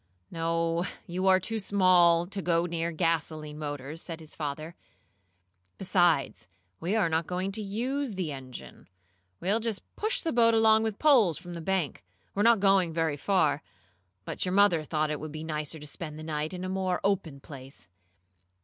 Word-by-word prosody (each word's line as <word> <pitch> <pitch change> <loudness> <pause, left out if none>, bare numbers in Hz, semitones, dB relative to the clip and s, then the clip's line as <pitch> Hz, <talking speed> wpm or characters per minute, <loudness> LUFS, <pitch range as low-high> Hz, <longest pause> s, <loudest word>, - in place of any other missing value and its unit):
"No, 165 0 0 0.2
you 185 +2 -2
are 185 0 +6
too 225 +4 -3
small 180 -4 +4
to 195 +2 -5
go 170 -1 +1
near 170 -1 -2
gasoline 155 -2 -1
motors," 145 +1 -5
said 165 -2 -6
his 155 -1 -10
father. 155 +2 -5 1.0
"Besides, 175 -6 +1 0.3
we 185 +6 -1
are 210 -6 +3
not 160 0 0
going 185 +2 -2
to 215 - -2
use 240 +4 -2
the 180 -5 -2
engine. 130 - -10 0.5
We'll 200 +5 +1
just 225 -3 -3
push 440 +4 0
the 330 - 0
boat 230 -1 +4
along 220 0 +5
with 220 -2 -2
poles 240 - +4
from 175 0 -9
the 170 - -6
bank. 170 - -1 0.3
We're 200 - -1
not 230 0 +5
going 195 -3 +3
very 160 -2 0
far, 155 -3 +1 0.6
but - - -3
your 180 - -1
mother 195 -5 +4
thought 155 0 -1
it 150 - -3
would 155 0 -6
be 155 +1 -6
nicer 155 0 -3
to 150 - -10
spend 155 0 -6
the 155 - -8
night 155 -1 -2
in 185 0 -5
a - - -3
more 185 -1 -1
open 180 -8 -1
place." 135 - -10
170 Hz, 175 wpm, -28 LUFS, 155-195 Hz, 1.0 s, are